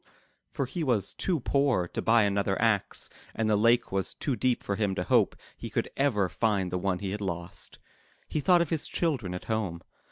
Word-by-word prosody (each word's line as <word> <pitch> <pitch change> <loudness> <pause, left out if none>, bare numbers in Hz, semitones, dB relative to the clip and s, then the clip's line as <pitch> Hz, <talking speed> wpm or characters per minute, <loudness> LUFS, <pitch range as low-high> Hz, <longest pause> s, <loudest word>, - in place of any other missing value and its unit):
*' - - -44
For 140 - 0
he 160 +7 -4
was 115 - +1
too 170 -7 -1
poor 135 -10 +2
to - - -3
buy 115 0 +4
another 100 -1 +1
axe 110 -3 +1 0.3
and 115 - 0
the 110 - +3
lake 115 +2 +3
was 95 -1 -1
too 135 - -1
deep 125 0 0
for 100 - -1
him 100 -2 0
to 90 - -1
hope - - +3 0.2
he - - -7
could - - -2
ever 115 -9 +2
find 100 -2 0
the 90 - -1
one 95 0 0
he 95 0 -4
had 105 +1 -4
lost. 85 -2 -5 0.5
He - - -2
thought 175 +3 +5
of 165 - -8
his 160 -2 -1
children 125 - -1
at 90 - -7
home. 100 -7 -2
105 Hz, 215 wpm, -28 LUFS, 95-130 Hz, 0.5 s, thought